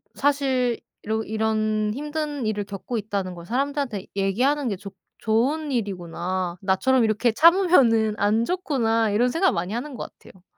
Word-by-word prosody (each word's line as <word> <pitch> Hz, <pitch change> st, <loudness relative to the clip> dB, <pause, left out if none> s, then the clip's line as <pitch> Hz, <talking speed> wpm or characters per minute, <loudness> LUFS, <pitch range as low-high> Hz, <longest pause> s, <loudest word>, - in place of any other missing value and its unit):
사실 265 Hz, -4 st, +1 dB, 0.2 s
'이런 220 Hz, +1 st, -1 dB
이런 215 Hz, -1 st, 0 dB
힘든 295 Hz, -3 st, -3 dB
일을 210 Hz, -1 st, -1 dB
겪고 205 Hz, +4 st, -5 dB
있다는 200 Hz, -3 st, -3 dB
걸 170 Hz, 0 st, -10 dB
사람들한테 265 Hz, -3 st, -2 dB
얘기하는 250 Hz, +9 st, +1 dB
게 200 Hz, -, -1 dB
좋 200 Hz, 0 st, -9 dB, 0.3 s
좋은 275 Hz, +7 st, 0 dB
일이구나. 185 Hz, -4 st, -3 dB
나처럼 230 Hz, +7 st, +2 dB
이렇게 220 Hz, +2 st, +2 dB
참으면은 270 Hz, -, +4 dB
안 215 Hz, +3 st, +2 dB
좋구나.' 235 Hz, -, 0 dB
이런 240 Hz, +5 st, +2 dB
생각을 370 Hz, +7 st, +2 dB
많이 180 Hz, +5 st, -3 dB
하는 260 Hz, +3 st, -4 dB
것 -, -, -7 dB
같아요. 185 Hz, -1 st, -18 dB
225 Hz, 340 characters per minute, -24 LUFS, 205-275 Hz, 0.3 s, 참으면은